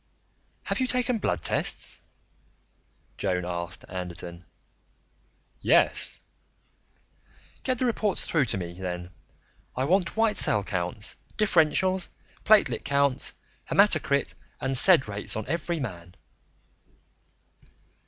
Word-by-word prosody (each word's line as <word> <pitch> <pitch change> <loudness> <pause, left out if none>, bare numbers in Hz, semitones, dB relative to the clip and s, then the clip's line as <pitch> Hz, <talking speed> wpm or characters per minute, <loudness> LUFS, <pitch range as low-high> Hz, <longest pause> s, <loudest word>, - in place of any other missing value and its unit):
"Have - - -2
you 255 - +1
taken 250 -2 +1
blood 90 - -1
tests?" - - -1 1.2
Joan 90 -3 -1
asked 85 0 -5
Anderton. 90 -1 -7 1.2
"Yes." - - +3 1.4
"Get 255 -1 0
the 255 - 0
reports 215 -4 +1
through 155 -5 +2
to 110 - -1
me, 85 -2 -5
then. 90 -1 -6 0.6
I 130 - 0
want 185 +6 +1
white 225 -2 +2
cell 105 - +5
counts, 90 +2 -3 0.2
differentials, 185 -1 +2 0.4
platelet 215 0 +4
counts, 140 -2 +1 0.4
hematocrit - - +3 0.3
and 130 0 -2
sed 160 - +5
rates 100 0 -1
on 110 -1 -3
every 170 +2 -2
man." 90 - -7
130 Hz, 105 wpm, -27 LUFS, -, 1.4 s, cell